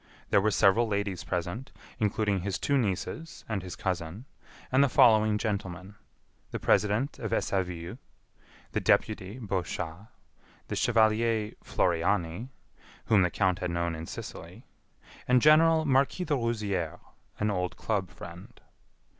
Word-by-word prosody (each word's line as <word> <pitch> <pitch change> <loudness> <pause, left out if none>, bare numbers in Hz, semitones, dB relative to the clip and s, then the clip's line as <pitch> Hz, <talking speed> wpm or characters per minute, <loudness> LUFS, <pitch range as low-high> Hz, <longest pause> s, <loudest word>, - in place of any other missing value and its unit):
There 100 - +5
were 110 - +2
several 105 +3 +4
ladies 100 -3 -2
present, 90 - -4 0.3
including 105 -1 +1
his 100 0 -2
two 140 - 0
nieces 130 - -2
and 110 -4 -2
his 90 0 -7
cousin, 90 +3 -3 0.5
and 130 +2 +5
the 140 - +3
following 110 -3 +5
gentlemen: 100 -3 -4 0.6
the - - -4
president 105 +7 +1
of 110 - -4
Essaville, 90 +2 -2 0.7
the - - 0
deputy 105 0 +1
Bochas, 95 -3 -4 0.6
the - - -2
chevalier 110 -1 +2
Floriani, 90 +4 0 0.6
whom 105 -4 +4
the 90 - +3
count 90 0 +1
had 90 - -2
known 85 0 -1
in 80 0 -6
Sicily, - - -9 0.6
and 125 0 +5
General 160 +2 +5
Marquis 140 +5 +2
de 155 - 0
Rouzières, 105 - -1 0.4
an 105 0 0
old 90 -2 -2
club 100 -5 -1
friend. 85 +1 -11
105 Hz, 130 wpm, -29 LUFS, 90-115 Hz, 0.7 s, There